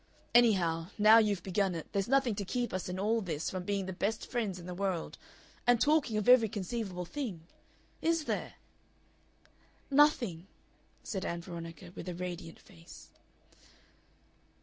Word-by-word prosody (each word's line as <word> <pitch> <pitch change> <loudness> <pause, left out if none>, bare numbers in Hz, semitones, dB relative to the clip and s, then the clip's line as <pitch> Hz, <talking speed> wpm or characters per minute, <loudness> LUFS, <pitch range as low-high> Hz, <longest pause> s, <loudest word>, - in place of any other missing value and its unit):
Anyhow, 175 -9 +4
now 215 +2 +8
you've 205 -5 +1
begun 190 -1 0
it, 165 - -5
there's 195 -2 0
nothing 265 -2 +3
to 200 - -3
keep 240 +5 -2
us 185 -1 -3
in 180 - -4
all 220 +4 +1
this 165 -5 -3
from 185 - -3
being 200 -1 -1
the 190 - -5
best 210 +5 -2
friends 220 -7 -1
in 175 - -10
the 180 - -5
world. 185 -2 -2 0.5
And 245 -1 +5
talking 290 -4 +2
of 210 - -1
every 245 -3 +7
conceivable 195 -3 -4
thing. 220 - -5 0.6
Is 330 -1 +1
there?" - - -3 1.4
"Nothing," 240 - +3 0.6
said 190 -5 -4
Ann 170 0 -3
Veronica, 170 -2 -8
with 180 - -6
a 175 - -5
radiant 175 -2 -6
face. 80 0 -15
195 Hz, 150 wpm, -32 LUFS, 175-230 Hz, 1.4 s, now